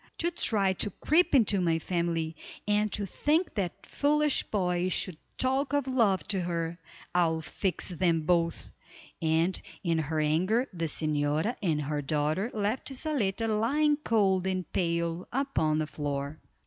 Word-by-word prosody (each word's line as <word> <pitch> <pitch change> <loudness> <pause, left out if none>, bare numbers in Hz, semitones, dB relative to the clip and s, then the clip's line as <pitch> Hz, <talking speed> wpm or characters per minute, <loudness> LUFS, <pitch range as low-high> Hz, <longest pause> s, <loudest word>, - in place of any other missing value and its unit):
To 340 +1 0
try 200 - +2
to 205 - -1
creep 315 - +2
into 210 -6 +4
my 165 -2 +2
family, 165 -1 -1 0.3
and 210 0 +2
to 205 - -1
think 305 - 0
that 190 -5 -3
foolish 300 0 +2
boy 180 -3 0
should 185 -2 -1 0.2
talk 265 +2 +1
of 285 -2 +2
love 225 -8 +2
to 195 -2 +1
her. 170 -1 -3 0.3
I'll 165 -2 +2
fix 185 +5 -3
them 170 -2 +1
both," 170 +1 0 0.5
and 165 +3 +1 0.2
in 165 -3 +1
her 155 0 -1
anger 185 - +2
the 165 -2 -2
señora 155 +6 0
and 155 -6 0
her 145 +1 -2
daughter 155 - 0
left 215 +6 -2
Zaletta 245 -7 0
lying 275 +8 +2
cold 195 -9 +2
and 185 -1 -1
pale 170 0 -1
upon 240 - 0
the 155 - 0
floor. 145 0 -4
185 Hz, 150 wpm, -29 LUFS, 160-225 Hz, 0.5 s, into